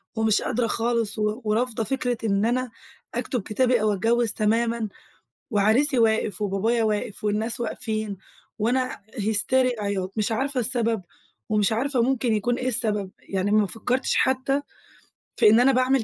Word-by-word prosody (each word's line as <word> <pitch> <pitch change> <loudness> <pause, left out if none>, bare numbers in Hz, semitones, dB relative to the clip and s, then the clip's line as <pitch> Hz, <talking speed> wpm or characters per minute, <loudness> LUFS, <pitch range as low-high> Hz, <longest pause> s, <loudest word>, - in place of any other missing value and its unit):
ومش 220 -1 +2
قادرة 235 0 0
خالص 230 -1 -1
و 210 +3 -1
ورافضة 225 +1 0
فكرة 245 +1 -1
إن 200 -1 +1
أنا 250 0 0 0.4
أكتب 245 0 -2
كتابي 240 +3 +1
أو 215 -1 +2
أتجوز 230 +3 +1
تمامًا، 230 +1 0 0.6
وعريسِي 235 +7 +3
واقف 220 -3 +1
وبابايا 220 +4 +1
واقف 210 0 -2
والناس 220 +3 -1
واقفين، 215 -2 -3 0.4
وأنا 255 +4 0
هيستيريا 235 +2 +1
عياط، 195 -2 -2
مش 215 +1 0
عارفة 265 +3 -1
السبب 230 -3 0 0.5
ومش 210 -1 +2
عارفة 250 +2 +1
ممكن 250 -2 +1
يكون 230 +4 0
إيه 255 - -1
السبب، 210 -5 -1
يعني 195 +1 -2
ما 215 -1 +4
فكرتش 250 +6 -1
حتى 265 +2 +1 0.8
في - - +7
إن 220 +3 +6
أنا 265 +2 +5
باعمل 255 0 +2
225 Hz, 145 wpm, -24 LUFS, 210-250 Hz, 0.8 s, في